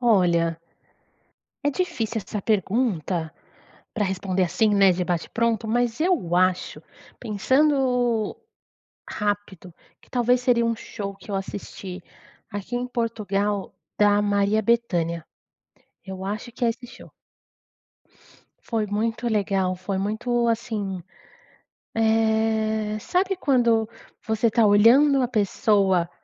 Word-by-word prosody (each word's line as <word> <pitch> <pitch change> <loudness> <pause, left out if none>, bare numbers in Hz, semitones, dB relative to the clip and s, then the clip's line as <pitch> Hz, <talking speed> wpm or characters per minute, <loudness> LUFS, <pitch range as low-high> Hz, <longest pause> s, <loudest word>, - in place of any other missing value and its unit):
Olha, 170 -8 +2 1.0
é 290 - +2
difícil 230 - -2
essa 210 - -4
pergunta, 190 - 0 0.6
pra 215 - 0
responder 190 -1 0
assim, 180 +6 +1
né, 195 -2 +6
de 180 0 -2
bate 175 -2 -2
pronto, 230 -1 0
mas 240 +2 0
eu 320 - +1
acho, 185 0 +1 0.4
pensando 250 -1 +1 0.7
rápido, 205 -4 -3 0.3
que - - -24
talvez 245 0 +2
seria 240 -2 +3
um 230 0 0
show 200 -2 -7
que 195 +2 -11
eu - - -1
assisti, 195 -1 -6 0.5
aqui 205 +4 -5
em 245 +1 -2
Portugal, 210 -4 -2 0.3
da 205 0 +4
Maria 205 +1 +2
Bethânia, 175 -8 0 0.8
eu 190 -1 -7
acho 215 +4 -5
que 250 - -3
é 230 - +4
esse 245 +2 -8
show. 245 - -14 1.5
Foi 225 -3 -2
muito 225 +3 -1
legal, 195 -4 0
foi 190 +1 -3
muito 235 +4 0
assim, 215 -5 -2 1.0
eh, 220 -1 +1
sabe 370 - 0
quando 235 -9 +2 0.4
você 220 +1 +1
está 225 0 +3
olhando 245 +8 +6
a 250 - +1
pessoa, 200 -5 +2
215 Hz, 115 wpm, -24 LUFS, 195-235 Hz, 1.5 s, né